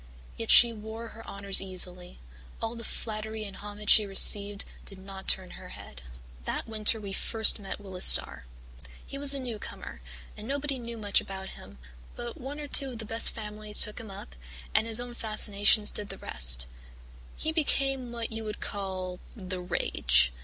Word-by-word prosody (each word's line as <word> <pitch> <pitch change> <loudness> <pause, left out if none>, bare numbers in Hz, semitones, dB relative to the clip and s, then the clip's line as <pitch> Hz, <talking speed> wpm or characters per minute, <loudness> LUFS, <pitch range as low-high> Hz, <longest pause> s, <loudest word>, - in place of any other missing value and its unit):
Yet 225 - -6
she 235 -1 +8
wore 220 +1 -9
her 225 +1 -13
honours 200 -1 -3
easily; 180 -1 -3 0.4
all 225 0 -4
the 230 -1 -9
flattery 220 -1 -6
and 200 -2 -9
homage 205 0 -4
she 215 - +6
received 200 +1 -1 0.2
did 195 - -13
not 190 0 -11
turn 185 -1 -2
her - - -11
head. - - -12 0.4
"That - - -4
winter 220 0 0
we 200 -2 -7
first 220 +2 +2
met 195 0 -7
Willis 190 -3 -4
Starr. - - +7 0.6
He 275 - -7
was 280 0 +9
a - - -4
newcomer, 225 - -8 0.3
and 215 - -9
nobody 280 0 -3
knew 235 -1 -8
much 205 -2 0
about 190 0 -8
him, 65 - -13 0.4
but 240 -1 -8
one 280 +4 -7
or 295 - -7
two 275 -1 +5
of - - -9
the 220 - -6
best 225 +2 +4
families 210 -1 -2
took 210 - +2
him 225 -3 -10
up, 190 - -11 0.4
and 220 - +2
his 225 0 +3
own 245 0 -7
fascinations 210 -2 +2
did 205 -1 -4
the - - -8
rest. - - +3 0.7
He 315 - -2
became 270 -5 +1
what 235 -1 -5
you 225 0 -5
would 210 -1 -7
call 185 -2 -5 0.2
the 185 -4 -6
rage. 65 - +1
210 Hz, 180 wpm, -27 LUFS, 195-230 Hz, 0.7 s, was